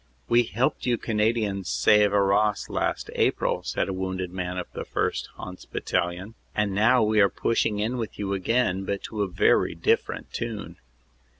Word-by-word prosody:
"We 120 +1 +5
helped 120 +4 -1
you 120 -1 +2
Canadians 105 -4 0
save 105 - +4
Arras 100 +1 +2
last - - -2
April," - - +1
said - - -2
a 95 - -2
wounded 95 -1 -3
man 90 0 -4
of 90 - -3
the - - -4
1st. - - -2
Hants. 90 0 -9
Battalion, 90 +4 -2 0.2
"and 105 -2 0
now 110 +5 +4
we 105 0 +3
are 100 - +5
pushing 110 -1 0
in 110 +5 -1
with 115 -3 -5
you 100 -1 -2
again, 95 -1 +1
but 100 +1 -3
to 110 -2 -4
a 100 - +1
very 90 0 +2
different - - -1
tune." 110 -3 -5
100 Hz, 170 wpm, -26 LUFS, 95-110 Hz, 0.2 s, We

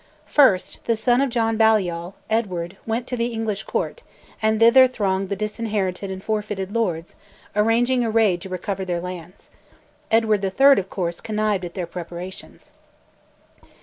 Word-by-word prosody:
First, 255 -11 +3
the 230 - +2
son 240 +3 +2
of 275 - +1
John 225 -2 0
Balliol, 190 -5 +2
Edward, 190 -5 -2
went 230 +2 -1
to 250 - -4
the 235 -1 0
English 225 -3 -3
Court, 485 - -3 0.4
and 220 0 +2
thither 245 +3 +7
thronged 195 -6 -1
the 200 - -1
disinherited 210 -2 -2
and 190 0 -6
forfeited 210 -3 -3
lords, 180 -8 -2 0.4
arranging 240 +4 +2
a 230 - 0
raid 215 -6 +2
to 190 - -8
recover 190 +1 -3
their 175 -2 -2
lands. 180 0 -9 0.6
Edward 220 -3 +2
III., 270 +8 +5
of 190 0 -6
course, 175 -3 -3
connived 215 -3 -1
at 170 - -9
their 180 -3 -2
preparations. 175 +2 -9
210 Hz, 150 wpm, -22 LUFS, 185-225 Hz, 0.6 s, thither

